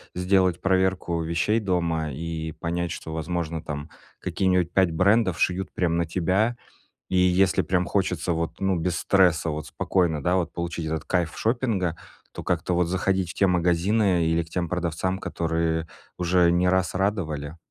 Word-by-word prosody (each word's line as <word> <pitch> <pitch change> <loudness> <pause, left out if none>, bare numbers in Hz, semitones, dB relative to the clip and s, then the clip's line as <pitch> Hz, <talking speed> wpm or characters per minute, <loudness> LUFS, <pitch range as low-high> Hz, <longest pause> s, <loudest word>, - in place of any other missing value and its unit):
сделать 90 -1 +2
проверку 95 -3 +1
вещей 85 +7 +1
дома, 85 -6 -1
и 80 +1 -4
понять, 85 +1 -3
что, 80 - -6
возможно, 80 0 -3
там, 75 -1 -6 0.3
какие-нибудь 90 -3 0
5 95 -2 +3
брендов 95 +1 +2
шьют 90 +1 0
прям 85 -2 0
на 85 - +1
тебя, 95 +8 +1 0.5
и 95 - -1
если 90 0 +3
прям 90 -1 0
хочется, 95 -2 0
вот, 85 0 -3
ну, 95 -1 +1
без 85 +1 -1
стресса, 90 -5 +3
вот, 75 0 -4
спокойно, 85 -6 0
да, 90 +4 +2
вот, 90 -2 -1
получить 85 -1 -4
этот 80 0 -3
кайф 85 -4 0
шопинга, 110 -8 0 0.4
то - - -7
как-то, 90 - -1
вот, 90 0 +3
заходить 95 +1 0
в - - -8
те 100 - +3
магазины 90 +1 +2
или 80 +1 +2
к 80 - -13
тем 85 -1 -2
продавцам, 90 +2 -2
которые 80 -2 -1 0.3
уже 90 -1 +3
не 90 +1 +2
раз 95 0 +1
радовали. 85 -6 -2
90 Hz, 165 wpm, -25 LUFS, 80-95 Hz, 0.5 s, 5